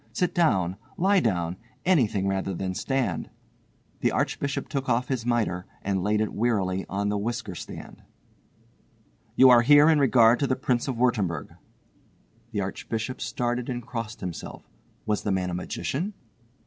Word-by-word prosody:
Sit 180 - 0
down, 95 - +2 0.2
lie 195 +2 +4
down, 90 - -1 0.3
anything 115 - +2
rather 95 -1 -1
than 95 +1 -3
stand." 135 +6 -1 0.7
The - - +2
Archbishop 140 -1 -1
took 135 -3 -3
off 125 +1 +1
his 125 -3 -2
mitre 110 -7 0 0.2
and 95 -1 0
laid 105 +3 +1
it 110 - -1
wearily 100 -5 0
on 100 +1 -1
the 105 0 0
whisker 115 -1 -3
stand. - - -9 1.3
"You 130 -1 +8
are 120 -1 +7
here 145 +5 +7
in 155 - +4
regard 120 -3 +5
to 140 - +1
the 130 - +1
Prince 125 -1 0
of 130 - -1
Wurttemberg." 105 -10 0 1.0
The - - -1
Archbishop 115 +3 -4
started 120 0 -2
and 120 -2 -4
crossed 115 -3 -5
himself. 90 -3 -7 0.4
Was 105 -1 0
the 105 - -1
man 90 -1 0
a - - -4
magician? 145 - -3
115 Hz, 155 wpm, -26 LUFS, 95-130 Hz, 1.3 s, You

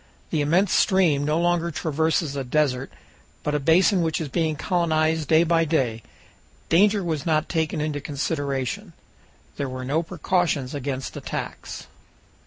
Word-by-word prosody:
The 155 - +1
immense 175 +6 +2
stream 175 -8 +3
no 155 +2 +1
longer 175 0 +1
traverses 160 -1 0
a 135 - -2
desert, 130 -1 0 0.5
but 150 - -1
a 150 - +1
basin 175 +6 +4
which 160 -1 0
is 155 -3 -4
being 160 +1 0
colonized 160 -2 +1
day 160 +2 +5
by 165 0 +3
day. 130 -8 0 0.7
Danger 200 +4 +4
was 160 -5 -2
not 155 -1 +1
taken 160 -2 -1
into 150 -1 -2
consideration. 140 -3 -3 0.6
There 140 -2 -2
were 130 0 -5
no 145 +5 +1
precautions 165 -5 -1
against 135 -2 -4
attacks. - - -6
155 Hz, 145 wpm, -24 LUFS, 140-170 Hz, 0.7 s, day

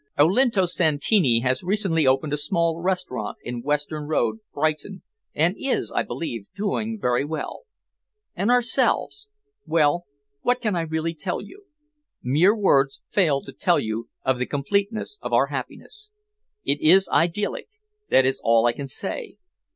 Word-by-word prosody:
Olinto 195 - +4
Santini 155 - +2
has 130 +1 0
recently 180 -6 +1
opened 135 +3 +2
a - - +1
small 165 +2 0
restaurant 180 -7 -2
in 120 -1 -5
Western 150 +2 -2
Road, 160 +7 0
Brighton, 155 +6 -2 0.3
and 170 +6 +2
is, 275 - -1
I - - +1
believe, 115 -11 -5
doing 215 +2 -2
very 125 -5 +1
well. 155 - -5 0.7
And 195 +5 0
ourselves! 245 - +2 0.4
Well, 165 +2 +2 0.3
what 245 +7 +1
can 215 -6 -1
I 170 - 0
really 160 0 -2
tell 165 +3 -3
you? 400 +1 -13 0.6
Mere 165 - +3
words 135 -9 +2
fail 155 -9 +2
to 135 - -10
tell 175 -3 +2
you 110 +1 -4 0.2
of 130 -1 +1
the 125 - -1
completeness 200 - -2
of - - -5
our - - +5
happiness. 425 0 -7 0.6
It 145 - 0
is 185 +4 +5
idyllic 190 - 0 0.4
that 130 - +5
is 130 0 0
all 115 0 +4
I 120 - +4
can 140 +3 -7
say. 440 - -4
165 Hz, 150 wpm, -24 LUFS, 140-200 Hz, 0.7 s, our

